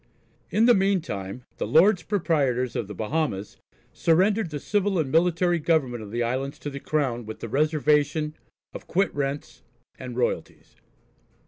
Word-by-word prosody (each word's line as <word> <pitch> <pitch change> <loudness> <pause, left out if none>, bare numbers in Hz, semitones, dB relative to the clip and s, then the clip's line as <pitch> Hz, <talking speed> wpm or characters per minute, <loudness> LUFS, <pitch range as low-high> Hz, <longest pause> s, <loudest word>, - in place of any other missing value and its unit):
In 220 +2 +3
the 245 - +7
meantime 155 - -1
the - - -2
Lords 185 +3 +5
Proprietors 145 - 0
of - - -2
the 105 - -8
Bahamas 110 - -2 0.4
surrendered 190 +4 +2
the 150 -1 -5
civil 200 +3 0
and 150 -5 -1
military 175 +1 +2
government 145 -7 +1
of 105 - -8
the 120 +3 -1
islands 130 +4 -2
to 145 - -6
the 140 - -6
Crown 135 -6 -1
with 110 - -7
the - - -5
reservation 150 +2 +1 0.4
of - - -9
quit 195 +3 +1
rents 140 -3 -4 0.4
and 125 -2 -7
royalties. 125 - -3
150 Hz, 150 wpm, -25 LUFS, 125-175 Hz, 0.4 s, the